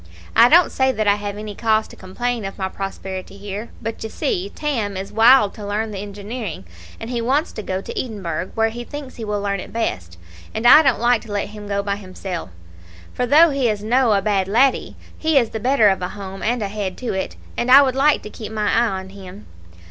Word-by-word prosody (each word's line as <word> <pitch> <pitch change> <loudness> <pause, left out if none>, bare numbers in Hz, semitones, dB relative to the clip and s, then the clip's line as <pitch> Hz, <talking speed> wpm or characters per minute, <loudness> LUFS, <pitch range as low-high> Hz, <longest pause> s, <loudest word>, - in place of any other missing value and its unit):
"I 235 +2 +7
don't 345 +4 +6
say 265 0 +2
that 215 -4 -2
I 205 - +6
have 205 0 -5
any 210 0 -6
cause 220 0 +1
to - - -12
complain 235 +5 -3
of 195 0 -6
my 190 - -2
prosperity 195 0 -6
here; 205 +3 -6
but, 225 0 -5
you 220 - -4
see, 190 -2 -2
Tam 230 -10 -2
is 195 +1 -6
wild 225 -1 +6
to 210 - -10
learn 215 +2 -2
the 200 - -5
engineering, 205 - -6 0.3
and 225 +2 -6
he 240 -1 -1
wants 275 +7 0
to - - -6
go 190 -2 -3
to - - -8
Edinburgh, 185 -7 -4
where 225 0 +2
he 240 +2 -7
thinks 285 0 -9
he 230 - -6
will 210 -1 -2
learn 200 -1 -2
it 185 - -8
best; 90 - -3 0.4
and 220 - -3
I 290 +6 +9
don't 270 -6 +2
like 240 0 +3
to 220 - -11
let 205 -1 -2
him 210 -1 -10
go 200 0 -1
by 200 0 -2
himsel', 185 - -6 0.6
for 250 - -1
though 310 +5 +6
he 270 -4 +1
is 210 -1 -2
no 240 +1 +3
a 200 -1 +1
bad 195 -3 +1
laddie, 250 +6 +2 0.2
he 315 -2 +1
is 235 -4 +2
the 220 - -4
better 245 -1 +4
of 190 -2 +2
a 180 - -2
home 195 -1 -8
and 235 0 0
a - - -1
head 195 -2 -4
to 250 - -3
it, 190 - -3 0.2
and 240 - -2
I 275 +2 +9
would 260 -2 0
like 290 +3 +3
to 210 - -8
keep 220 -1 -8
my 210 -2 0
eye 235 +1 +3
on 190 0 -10
him. 195 +1 -11
215 Hz, 240 wpm, -21 LUFS, 195-240 Hz, 0.6 s, I